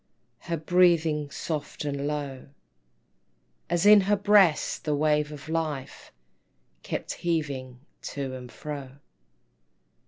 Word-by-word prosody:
Her 170 -1 -3
breathing 160 -3 +3
soft 150 0 -5
and 140 0 -2
low, 145 -3 -4 1.2
As 175 +2 +1
in 210 0 +9
her 205 +2 +2
breast 200 -5 +3
the 150 -1 0
wave 150 0 +1
of 150 0 -10
life 155 -4 -4 0.7
Kept - - -4
heaving 140 -7 -3 0.2
to 135 -2 -5
and 125 -1 -8
fro. 140 -4 -7
150 Hz, 105 wpm, -27 LUFS, 140-170 Hz, 1.2 s, in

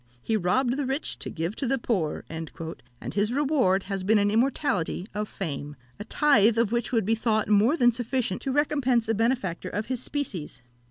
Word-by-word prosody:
"He 220 - 0
robbed 240 +7 +1
the 290 - -1
rich 270 +4 -2
to - - -4
give 170 +5 -3
to 270 - -1
the 270 +2 +1
poor;" 195 -11 -1
and 160 0 -6 0.6
his 205 +2 +1
reward 260 -9 +2
has 195 -1 -4
been 215 +3 +4
an 205 0 +2
immortality 225 - 0
of 210 0 -3
fame, 145 -5 -5 0.2
a - - -4
tithe 230 -4 +4
of 230 -2 +2
which 235 -1 -1
would 225 -5 +1
be 220 - +2
thought 220 -1 +1
more 215 +9 +4
than 240 -4 +5
sufficient 240 -3 -2
to 270 - -2
recompense 260 -5 +1
a 225 - +2
benefactor 215 -6 -1
of 210 +3 -3
his 255 -2 -3
species. 190 - -4
225 Hz, 195 wpm, -26 LUFS, 195-260 Hz, 0.6 s, than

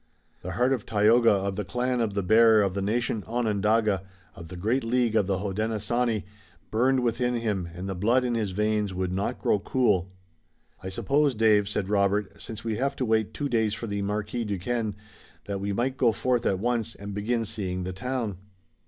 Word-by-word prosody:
The 90 - -5
heart 125 +7 +2
of 120 -6 -2
Tayoga 115 +2 +4
of 100 -1 0
the 105 - -1
clan 125 +5 -1
of 105 -3 -1
the 100 - 0
Bear 110 +2 +6
of 95 -2 0
the 100 - -2
nation 110 +1 -1
Onondaga, 110 -3 +1 0.3
of 85 - -10
the 90 - -9
great 110 +9 0
League 120 -1 +1
of 105 -4 +3
the 95 -2 +1
Hodenosaunee, 110 +3 -1 0.5
burned 130 +4 +2
within 125 +1 0
him 105 -7 -2
and 90 +2 -5
the 95 - -2
blood 115 +8 +2
in 120 - 0
his 110 -3 -1
veins 105 0 0
would 90 0 -2
not 95 +2 -2
grow 105 - +1
cool. 100 -5 +1 0.7
"I 95 - -5
suppose, 140 +7 +1
Dave," 105 -2 +3
said 105 -2 -2
Robert, 100 0 0
"since 110 -1 -7
we 110 -2 -2
have 140 +2 -1
to 130 - -1
wait 110 -1 +1
two 145 +5 -3
days 110 -4 +1
for - - -6
the 100 -2 -3
Marquis 105 +3 -2
Duquesne, 105 +2 -2 0.5
that 100 -1 -4
we 100 +1 -2
might 125 +6 -1
go 120 -3 +4
forth 125 +2 0
at 95 - +1
once 115 +2 -1
and 100 0 -7
begin 115 +3 -1
seeing 95 -4 -3
the 95 +1 -4
town." 115 -3 -3
105 Hz, 195 wpm, -26 LUFS, 100-120 Hz, 0.7 s, Bear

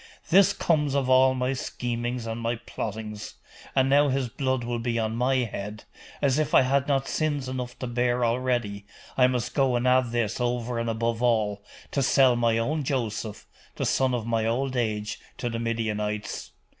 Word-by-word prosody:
This 195 +2 +7
comes 150 -7 +1
of 130 -2 +1
all 130 0 +5
my 130 +1 0
schemings 120 -1 -3
and 115 +1 -4
my 115 +1 0
plottings! 105 -1 -6 0.4
And 130 -1 +4
now 145 +2 +5
his 130 -2 0
blood 130 0 -1
will 120 0 -2
be 115 0 -1
on 110 -1 -1
my 125 +3 +2
head 105 -4 -3 0.4
as 140 +1 +3
if 155 - +1
I - - +7
bad 135 +1 +1
not 135 -2 +1
sins 145 -4 -1
enough 125 -1 -5
to - - -5
bear 120 0 +1
already, 115 -4 -1 0.3
I 125 -1 +5
must 125 -3 -2
go 135 -3 +2
and 120 +1 +1
add 125 -1 +4
this 115 -1 -1
over 120 -1 -1
and 115 0 -1
above 115 +1 -1
all, 105 -4 +1 0.3
to 140 - 0
sell 130 -1 +5
my 115 -1 +2
own 150 +7 0
Joseph, 115 -5 -3 0.3
the - - -2
son 130 -2 +2
of 115 -3 -3
my 115 -1 0
old 130 +4 -1
age, 110 -3 -1 0.2
to 120 - -3
the 115 - -3
Midianites! 105 - -2
120 Hz, 185 wpm, -26 LUFS, 115-130 Hz, 0.4 s, This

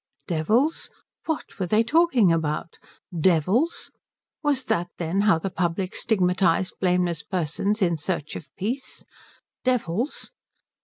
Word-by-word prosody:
Devils? 215 - +1 0.4
What 320 -8 -4
were 185 - -1
they 215 +4 +4
talking 260 - +4
about? 160 0 -1 0.4
Devils? 185 - +2 0.5
Was 290 -3 +1
that, 175 +1 0
then, 175 +3 0
how 165 - +5
the 185 +4 -4
public 180 +1 -1
stigmatized 185 -3 +2
blameless 180 -3 +1
persons 190 +5 -1
in 170 -2 +2
search 155 -1 -3
of 140 - -8
peace? 240 +8 -4 0.6
Devils? 245 - -1
185 Hz, 115 wpm, -25 LUFS, 170-230 Hz, 0.6 s, how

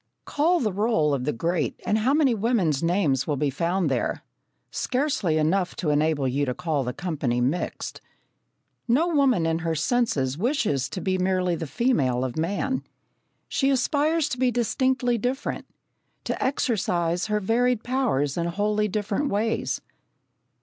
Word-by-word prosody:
Call 335 +5 +2
the 215 - -1
roll 195 -8 +2
of 130 -2 -1
the 150 - +1
great 165 -1 -1
and 215 - +2
how 240 +5 +2
many 285 -4 +3
women's 200 - +1
names 165 -6 +1
will 145 -2 0
be 145 0 0
found 170 +5 0
there? 130 -4 -1 0.5
Scarcely 255 - 0
enough 180 +4 +1
to 155 -4 -1
enable 150 -2 +1
you 135 +3 0
to 125 - -2
call 160 -6 -1
the 125 - -2
company 140 -6 -2
mixed. 135 +8 -2 0.9
No 290 +9 +3
woman 270 - +3
in 165 0 0
her 165 -1 -1
senses 160 - 0
wishes 210 - 0
to 185 - -5
be 185 -1 0
merely 185 -1 +1
the 160 -1 -5
female 135 - +1
of 125 - -4
man. 200 +11 -1 0.6
She 270 - +1
aspires 295 +4 +2
to 250 - -4
be 255 -1 +3
distinctly 245 +1 +1
different 255 +5 -3 0.6
to - - -2
exercise 180 -10 0
her 210 0 +1
varied 235 +3 +1
powers 235 - 0
in 170 0 0
wholly 210 +4 0
different 210 +7 -1
ways. 220 +3 -1
190 Hz, 155 wpm, -25 LUFS, 155-245 Hz, 0.9 s, many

